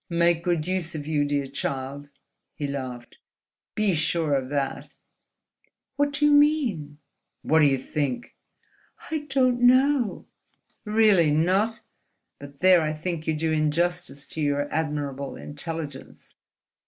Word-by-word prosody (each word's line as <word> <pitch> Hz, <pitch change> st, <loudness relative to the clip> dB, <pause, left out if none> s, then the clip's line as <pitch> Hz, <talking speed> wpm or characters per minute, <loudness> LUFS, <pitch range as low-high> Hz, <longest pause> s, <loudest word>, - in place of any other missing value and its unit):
"Make 170 Hz, 0 st, +2 dB
good 170 Hz, -3 st, 0 dB
use 180 Hz, -2 st, -2 dB
of 145 Hz, -2 st, -5 dB
you, 150 Hz, -1 st, +1 dB
dear 145 Hz, -1 st, -1 dB
child," 140 Hz, +1 st, -5 dB, 0.5 s
he 150 Hz, -, -4 dB
laughed: 130 Hz, -4 st, -6 dB, 0.6 s
"be 210 Hz, -3 st, +2 dB
sure 160 Hz, -1 st, +1 dB
of 130 Hz, -2 st, -1 dB
that!" 140 Hz, -2 st, -3 dB, 1.0 s
"What 285 Hz, 0 st, 0 dB
do 295 Hz, +1 st, +1 dB
you 295 Hz, -, +5 dB
mean?" 270 Hz, -, +2 dB, 0.5 s
"What 160 Hz, +1 st, +3 dB
do 150 Hz, -, +6 dB
you 135 Hz, -1 st, +2 dB
think?" 135 Hz, -1 st, -3 dB, 0.8 s
"I 305 Hz, -2 st, -3 dB
don't 255 Hz, -2 st, +2 dB
know 255 Hz, -1 st, +3 dB, 0.3 s
..." -, -, -46 dB
"Really 210 Hz, -6 st, +4 dB
not? 190 Hz, +9 st, +1 dB, 0.6 s
But 140 Hz, 0 st, -12 dB
there 185 Hz, -2 st, +6 dB
I 155 Hz, -1 st, -1 dB
think 160 Hz, 0 st, -4 dB
you 160 Hz, -, +1 dB
do 160 Hz, +1 st, -1 dB
injustice 155 Hz, -1 st, -1 dB
to 160 Hz, -, -5 dB
your 145 Hz, -1 st, 0 dB
admirable 145 Hz, -3 st, -3 dB
intelligence." 150 Hz, -2 st, -7 dB
160 Hz, 135 wpm, -25 LUFS, 145-190 Hz, 1.0 s, do